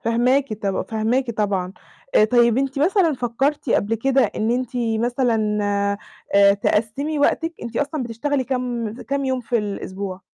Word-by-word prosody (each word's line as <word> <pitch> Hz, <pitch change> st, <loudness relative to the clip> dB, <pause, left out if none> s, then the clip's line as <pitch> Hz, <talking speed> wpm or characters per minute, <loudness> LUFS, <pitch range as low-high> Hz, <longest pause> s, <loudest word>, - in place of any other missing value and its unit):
فاهماكِ 250 Hz, +3 st, +1 dB
طب 195 Hz, -1 st, 0 dB
فاهماكِ 230 Hz, +4 st, 0 dB
طبعًا. 200 Hz, -4 st, -1 dB, 0.4 s
آآ، -, -, +6 dB
طيب 235 Hz, +1 st, +3 dB
أنتِ 270 Hz, 0 st, -1 dB
مثلًا 340 Hz, +2 st, +3 dB
فكرتِ 260 Hz, +3 st, -1 dB
قبل 215 Hz, +1 st, +2 dB
كده 270 Hz, +4 st, +2 dB
إن 220 Hz, +1 st, -1 dB
أنتِ 250 Hz, 0 st, -1 dB
مثلًا، 230 Hz, -2 st, 0 dB, 0.8 s
آآ 200 Hz, 0 st, +6 dB
تقسمي 225 Hz, +9 st, -1 dB
وقتِك؟ 325 Hz, +3 st, +1 dB
أنتِ 235 Hz, 0 st, -6 dB
أصلًا 290 Hz, 0 st, -1 dB
بتشتغلي 255 Hz, +4 st, -2 dB
كام 245 Hz, -4 st, -2 dB
كام 275 Hz, 0 st, -2 dB
يوم 260 Hz, -1 st, 0 dB
في 240 Hz, 0 st, -1 dB
الأسبوع؟ 195 Hz, -2 st, -5 dB
240 Hz, 145 wpm, -22 LUFS, 215-270 Hz, 0.8 s, آآ